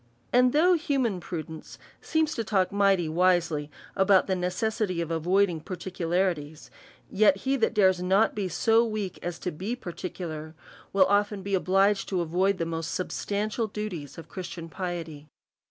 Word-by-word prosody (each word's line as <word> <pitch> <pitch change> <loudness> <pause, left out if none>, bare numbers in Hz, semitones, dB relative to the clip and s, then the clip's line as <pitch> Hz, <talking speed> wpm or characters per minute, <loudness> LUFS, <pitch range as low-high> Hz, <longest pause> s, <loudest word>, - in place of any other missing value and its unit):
And 250 0 +5
though 335 +6 +4
human 275 - 0
prudence 160 -2 -7 0.2
seems 315 -1 0
to 230 - -2
talk 195 -4 +1
mighty 195 -4 +3
wisely 165 -3 +1 0.3
about 190 0 +4
the 190 - 0
necessity 185 +1 -1
of 165 -1 -3
avoiding 175 +2 +2
particularities, 175 -3 -2 0.4
yet 200 -1 +4
he 270 +1 +2
that 230 -1 +1
dares 190 -3 +4
not 195 +5 +3
to - - -21
be 200 -3 -2
so 225 +6 +3
weak 215 -5 -3
as 175 -1 -4
to 180 - -4
be 195 +10 -4
particu 180 -4 -6
lar, 155 0 -7 0.4
will 195 -1 +5
be - - -3
often 200 -1 +1
obliged 195 +2 +2
to 185 -3 0
avoid 185 +4 +1
the 165 - -1
most 165 -1 -3
substantial 210 +4 -2
duties 200 -9 -6
of 165 -1 -9
Christian 175 -2 -7
piety. 165 -5 -5
185 Hz, 160 wpm, -27 LUFS, 170-210 Hz, 0.4 s, And